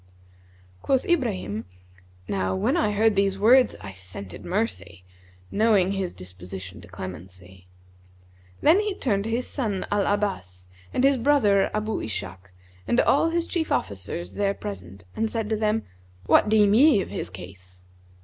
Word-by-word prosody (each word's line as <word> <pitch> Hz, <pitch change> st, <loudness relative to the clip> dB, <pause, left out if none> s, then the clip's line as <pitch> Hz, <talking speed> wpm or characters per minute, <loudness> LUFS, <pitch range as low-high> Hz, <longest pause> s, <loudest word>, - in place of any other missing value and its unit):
(Quoth 265 Hz, -2 st, +1 dB
Ibrahim), 110 Hz, -, -1 dB, 0.6 s
Now 95 Hz, -1 st, -1 dB
when 95 Hz, -, +1 dB
I 210 Hz, -, +2 dB
heard 210 Hz, +1 st, +2 dB
these 195 Hz, 0 st, +2 dB
words 245 Hz, +6 st, +5 dB
I 100 Hz, -, -7 dB
scented 95 Hz, +1 st, -9 dB
mercy, 180 Hz, -, -3 dB, 0.5 s
knowing 205 Hz, -3 st, +3 dB
his 195 Hz, -3 st, -3 dB
disposition 95 Hz, +1 st, -9 dB
to 85 Hz, -, -13 dB
clemency.[FN#158] 90 Hz, 0 st, -13 dB
Then 330 Hz, +6 st, +5 dB
he 420 Hz, -2 st, -1 dB
turned 200 Hz, -, -1 dB
to -, -, -3 dB
his 235 Hz, +2 st, -1 dB
son 215 Hz, -9 st, -3 dB
Al 205 Hz, -1 st, +1 dB
Abbas 140 Hz, -, -3 dB, 0.3 s
and 255 Hz, -, 0 dB
his 275 Hz, 0 st, +4 dB
brother 230 Hz, -7 st, +3 dB
Abu 215 Hz, 0 st, -1 dB
Ishak 95 Hz, -3 st, -6 dB, 0.4 s
and 240 Hz, -, +2 dB
all 305 Hz, +4 st, +3 dB
his 335 Hz, 0 st, 0 dB
chief 335 Hz, -2 st, -2 dB
officers 95 Hz, -2 st, -3 dB
there 200 Hz, -1 st, 0 dB
present 95 Hz, -1 st, -8 dB
and 225 Hz, 0 st, 0 dB
said 225 Hz, -1 st, -3 dB
to -, -, +3 dB
them, 215 Hz, +1 st, 0 dB, 0.4 s
'What 210 Hz, -, +4 dB
deem 210 Hz, -2 st, +4 dB
ye 255 Hz, -2 st, +6 dB
of -, -, -6 dB
his -, -, -4 dB
case?' 90 Hz, 0 st, -11 dB
190 Hz, 150 wpm, -25 LUFS, -, 0.6 s, ye